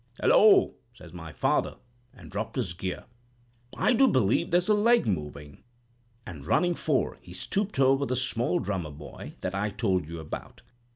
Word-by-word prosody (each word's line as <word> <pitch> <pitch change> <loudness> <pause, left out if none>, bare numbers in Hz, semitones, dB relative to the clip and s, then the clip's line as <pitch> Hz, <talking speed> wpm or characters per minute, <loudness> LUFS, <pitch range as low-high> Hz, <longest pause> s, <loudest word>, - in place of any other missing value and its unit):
'Hullo!' 430 -6 +5 0.2
says 85 -6 -14
my 80 -3 -8
father, - - 0 0.4
and - - -14
dropped - - -4
his 90 - -2
gear, 90 +1 -5 0.7
'I - - +3
do 265 +3 +5
believe 120 - +2
there's 175 +1 +2
a 215 - +4
leg 230 - +4
moving?' 75 -7 -4 0.6
and 80 -7 -9
running 175 - +2
fore, 155 -4 -1
he 90 - -12
stooped 195 - -2
over 135 +1 +3
the 130 - -1
small 125 +5 0
drummer 95 - -3
boy 75 0 -10
that 95 - -3
I 100 +2 -1
told 95 -6 -1
you 85 0 -6
about. 80 -1 -8
105 Hz, 165 wpm, -27 LUFS, -, 0.7 s, Hullo